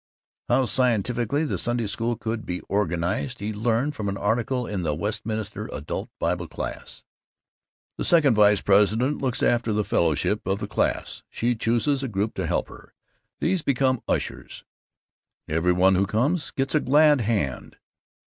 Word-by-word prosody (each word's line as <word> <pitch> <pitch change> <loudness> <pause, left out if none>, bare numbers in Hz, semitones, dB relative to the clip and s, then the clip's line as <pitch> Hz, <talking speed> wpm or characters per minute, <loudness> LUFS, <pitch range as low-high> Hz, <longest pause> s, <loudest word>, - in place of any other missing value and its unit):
How 135 - +3
scientifically 125 +3 +1
the - - -2
Sunday 120 -1 -1
School 115 +4 -1
could 110 0 -3
be 90 0 -4
organized 100 +5 -1
he 105 +2 -3
learned 115 +6 0
from 105 -7 -3
an 100 - -3
article 120 +4 0
in 100 -4 -3
the 75 -3 -1
Westminster 105 +2 -3
Adult 80 - -5
Bible 85 -1 -1
Class: - - -6 1.0
"The - - -1
second 155 -7 +4
vice 105 -1 +4
president 105 +8 +3
looks 130 -3 -1
after 120 -1 +2
the 105 0 +1
fellowship 85 +5 0
of 95 +1 +1
the - - -5
class. - - -1
She 120 +1 0
chooses 120 +5 +1
a 135 - -2
group 105 -1 -2
to - - -3
help - - 0
her. - - -15 0.4
These 180 +1 +1
become 130 -3 +1
ushers. - - -3 0.8
Every 80 +3 +1
one 90 +2 +4
who 95 +1 +2
comes 135 - 0
gets 135 0 -2
a 155 - +4
glad 150 0 +4
hand. 100 - -2
110 Hz, 160 wpm, -25 LUFS, 100-130 Hz, 1.0 s, second